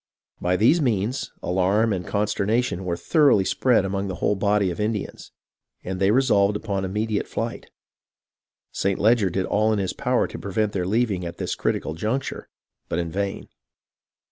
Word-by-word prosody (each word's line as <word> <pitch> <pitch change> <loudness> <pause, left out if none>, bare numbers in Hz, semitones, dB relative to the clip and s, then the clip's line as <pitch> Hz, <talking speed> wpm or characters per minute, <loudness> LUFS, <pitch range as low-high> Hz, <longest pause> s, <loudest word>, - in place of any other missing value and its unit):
By 90 +1 +1
these 140 - +4
means, 120 -1 -1
alarm 95 +5 +2
and 90 -2 -3
consternation 105 0 0
were 85 -1 -1
thoroughly 140 - +3
spread 120 0 +2
among 100 +1 -2
the 95 - -4
whole 90 - +1
body 100 -1 +1
of 85 - -7
Indians, 105 -1 -3 0.5
and 95 0 -4
they 95 0 +3
resolved 105 -4 +3
upon 100 -2 -2
immediate 105 +2 -2
flight. - - -4 1.0
St. 100 -1 -1
Leger 110 -2 +3
did 95 +1 -1
all 110 +1 +2
in 110 - +1
his 95 -2 -1
power - - +1
to - - -7
pre 100 - -7
vent 105 +1 +1
their 90 -2 -1
leaving 105 -3 0
at 85 0 -6
this - - -2
critical 80 - -2
juncture, 110 - -3 0.4
but - - -1
in 85 -1 -2
vain. 100 +1 -3
100 Hz, 170 wpm, -24 LUFS, 95-110 Hz, 1.0 s, these